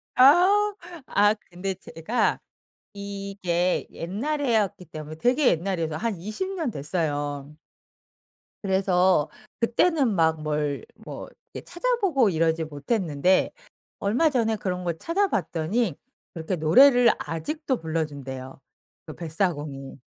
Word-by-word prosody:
아. 370 Hz, +10 st, +6 dB, 0.3 s
아 205 Hz, +1 st, +4 dB, 0.2 s
근데 185 Hz, +2 st, -3 dB
제가 185 Hz, +5 st, -1 dB, 0.5 s
이게 195 Hz, -3 st, -2 dB
옛날이었기 220 Hz, -, -1 dB
때문에 155 Hz, 0 st, -8 dB
되게 250 Hz, -, +3 dB
옛날이어서 165 Hz, -3 st, -1 dB
한 225 Hz, -1 st, -2 dB
20 215 Hz, -, -4 dB
년 320 Hz, -9 st, -2 dB
됐어요. 145 Hz, -2 st, -3 dB, 1.1 s
그래서 190 Hz, -4 st, +2 dB, 0.3 s
그때는 260 Hz, -, +2 dB
막 160 Hz, -2 st, +2 dB
뭘 150 Hz, -2 st, -2 dB
뭐 -, -, -9 dB, 0.3 s
이렇게 -, -, -7 dB
찾아보고 390 Hz, -, +1 dB
이러지 165 Hz, -1 st, +1 dB
못했는데 160 Hz, -, +1 dB, 0.5 s
얼마 245 Hz, +11 st, +2 dB
전에 225 Hz, -5 st, +1 dB
그런 180 Hz, -3 st, -3 dB
걸 170 Hz, -2 st, -2 dB
찾아봤더니 220 Hz, -, 0 dB, 0.4 s
그렇게 165 Hz, +2 st, -3 dB
노래를 245 Hz, -, +6 dB
아직도 255 Hz, -, -3 dB
불러준대요 140 Hz, -5 st, -4 dB, 0.5 s
그 155 Hz, -, -9 dB
뱃사공이. 150 Hz, -, -3 dB
185 Hz, 245 characters per minute, -25 LUFS, 160-240 Hz, 1.1 s, 아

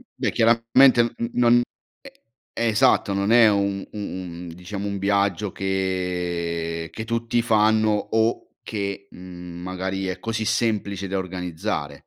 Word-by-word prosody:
beh, -, -, -1 dB
chiaramente 115 Hz, +2 st, +5 dB
n 115 Hz, 0 st, -4 dB
non 120 Hz, 0 st, +4 dB, 0.9 s
e 115 Hz, -, 0 dB
esatto, 105 Hz, -2 st, +3 dB
non 100 Hz, +2 st, 0 dB
è 120 Hz, -2 st, +7 dB
un 100 Hz, -1 st, 0 dB
u -, -, -9 dB
un 90 Hz, -3 st, -6 dB
diciamo 100 Hz, +3 st, -6 dB
un 100 Hz, -1 st, -3 dB
viaggio 100 Hz, 0 st, +1 dB
che 90 Hz, -3 st, -2 dB
che 110 Hz, -, -5 dB
tutti 115 Hz, +1 st, 0 dB
fanno 110 Hz, -1 st, +3 dB
o 110 Hz, +2 st, 0 dB
che, 100 Hz, -2 st, -4 dB
mhmm, 90 Hz, -1 st, -10 dB
magari 95 Hz, +1 st, -3 dB
è 90 Hz, 0 st, -4 dB
così 110 Hz, +1 st, -3 dB
semplice 105 Hz, -4 st, -1 dB
da 95 Hz, +1 st, -2 dB
organizzare. 90 Hz, -4 st, -4 dB
100 Hz, 135 wpm, -23 LUFS, 90-110 Hz, 0.9 s, è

